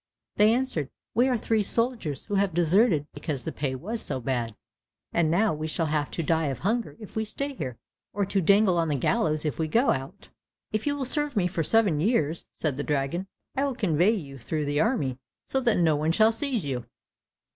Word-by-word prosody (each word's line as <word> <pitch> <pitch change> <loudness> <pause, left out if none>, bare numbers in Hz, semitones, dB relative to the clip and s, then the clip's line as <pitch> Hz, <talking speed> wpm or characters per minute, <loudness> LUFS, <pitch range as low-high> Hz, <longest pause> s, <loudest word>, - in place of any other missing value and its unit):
They 210 +1 +6
answered, 230 - -1 0.2
"We 245 +3 +4
are 255 -2 +2
three 220 0 +1
soldiers 225 - 0
who - - -6
have 195 -4 +1
deserted 175 -1 +3
because 140 -6 -4
the - - -3
pay 135 -2 -2
was 215 - -4
so - - -3
bad, 120 -3 -2 0.6
and 170 -2 +2
now 200 +5 +3
we 155 +1 -3
shall 165 +1 -1
have 150 -1 0
to 165 - -3
die 160 0 +1
of 135 - -2
hunger 225 +5 -1
if 215 - -11
we 220 - 0
stay 280 +6 -3
here, 130 - -5 0.3
or 200 0 0
to 195 0 0
dangle 195 0 +4
on 165 - +1
the 150 - 0
gallows 155 - +1
if 150 - -2
we 160 - +1
go 235 - +3
out." 135 +9 -5 0.4
"If 215 +5 -2
you 285 - +1
will 275 -2 -2
serve 295 +2 -1
me 195 -4 +2
for 175 -1 -1
seven 195 -2 +3
years," 165 - +1
said 145 -5 -2
the 145 - -2
dragon, 150 +6 -1 0.3
"I 270 - +1
will 275 -3 -1
convey 195 - +2
you 140 -8 -7
through 150 +5 -2
the 145 +1 +1
army 140 - 0 0.3
so 265 - 0
that 235 -4 +2
no 165 -3 +3
one 155 +2 +1
shall 220 +4 +5
seize 240 - -2
you." 125 -4 -3
175 Hz, 215 wpm, -27 LUFS, 150-225 Hz, 0.6 s, They